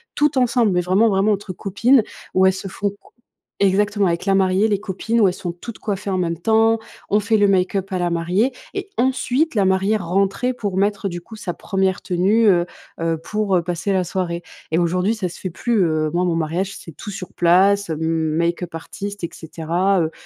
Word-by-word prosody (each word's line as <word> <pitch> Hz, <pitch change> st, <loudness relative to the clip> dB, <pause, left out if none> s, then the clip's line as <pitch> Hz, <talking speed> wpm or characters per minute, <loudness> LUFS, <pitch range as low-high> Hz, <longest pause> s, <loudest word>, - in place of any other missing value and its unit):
toutes 295 Hz, -2 st, +2 dB
ensembles. 240 Hz, -3 st, +3 dB
Mais 180 Hz, -1 st, +2 dB
vraiment, 190 Hz, +6 st, +3 dB
vraiment 200 Hz, +1 st, +2 dB
entre 200 Hz, -1 st, -5 dB
copines 225 Hz, +8 st, +3 dB, 0.3 s
où 190 Hz, 0 st, +4 dB
elles 190 Hz, -, +3 dB
se 190 Hz, +1 st, -6 dB
font 200 Hz, +2 st, -2 dB
co 200 Hz, 0 st, -17 dB, 0.5 s
exactement 205 Hz, +1 st, +2 dB
avec 170 Hz, +1 st, -1 dB
la 195 Hz, -, +2 dB
mariée, 190 Hz, +2 st, +3 dB
les 205 Hz, -3 st, 0 dB
copines 220 Hz, +4 st, -1 dB
où 205 Hz, -, +6 dB
elles 180 Hz, -, -1 dB
sont 175 Hz, -, -4 dB
toutes 210 Hz, +7 st, -9 dB
coiffées 200 Hz, -1 st, -4 dB
en 190 Hz, -, 0 dB
même 170 Hz, -2 st, -1 dB
temps, 225 Hz, +3 st, +3 dB, 0.3 s
on 210 Hz, -, +4 dB
fait 220 Hz, +2 st, +1 dB
le 205 Hz, -1 st, +4 dB
make-up 195 Hz, 0 st, +1 dB
à 185 Hz, -, 0 dB
la 175 Hz, 0 st, 0 dB
mariée. 180 Hz, +9 st, 0 dB, 0.2 s
Et -, -, -5 dB
ensuite 260 Hz, +4 st, +1 dB
la 205 Hz, -4 st, +2 dB
mariée 190 Hz, +3 st, +2 dB
rentrait 195 Hz, +6 st, 0 dB
pour 205 Hz, -6 st, -3 dB
mettre 200 Hz, 0 st, 0 dB
du 175 Hz, -1 st, -6 dB
coup 220 Hz, +5 st, -12 dB
sa 195 Hz, -5 st, -5 dB
1re 190 Hz, 0 st, -1 dB
tenue, 200 Hz, +6 st, +2 dB
heu 175 Hz, -3 st, +4 dB, 0.3 s
heu, 165 Hz, -1 st, -1 dB
pour, 210 Hz, +3 st, -1 dB
heu, -, -, +1 dB
passer 175 Hz, +3 st, -2 dB
la 185 Hz, -1 st, +2 dB
soirée. 175 Hz, -1 st, -3 dB, 0.3 s
Et 160 Hz, -, +2 dB
aujourd'hui 180 Hz, +4 st, +1 dB
ça 205 Hz, -5 st, -3 dB
se 175 Hz, -, -11 dB
fait 185 Hz, -, -4 dB
plus, 220 Hz, +3 st, +1 dB
heu, 155 Hz, -2 st, +1 dB
moi, 175 Hz, +1 st, +1 dB
mon 175 Hz, -2 st, +1 dB
mariage 170 Hz, +5 st, -2 dB
c'est 165 Hz, -, -11 dB
tout 205 Hz, -, -7 dB
sur 195 Hz, -2 st, -8 dB
place, 190 Hz, +2 st, +3 dB
m 155 Hz, -, -3 dB
make-up 165 Hz, +2 st, -1 dB
artist 200 Hz, +4 st, -7 dB
et 170 Hz, -, -1 dB
cetera, 170 Hz, +4 st, -1 dB
heu, 160 Hz, -1 st, -1 dB
190 Hz, 215 wpm, -21 LUFS, 175-205 Hz, 0.5 s, où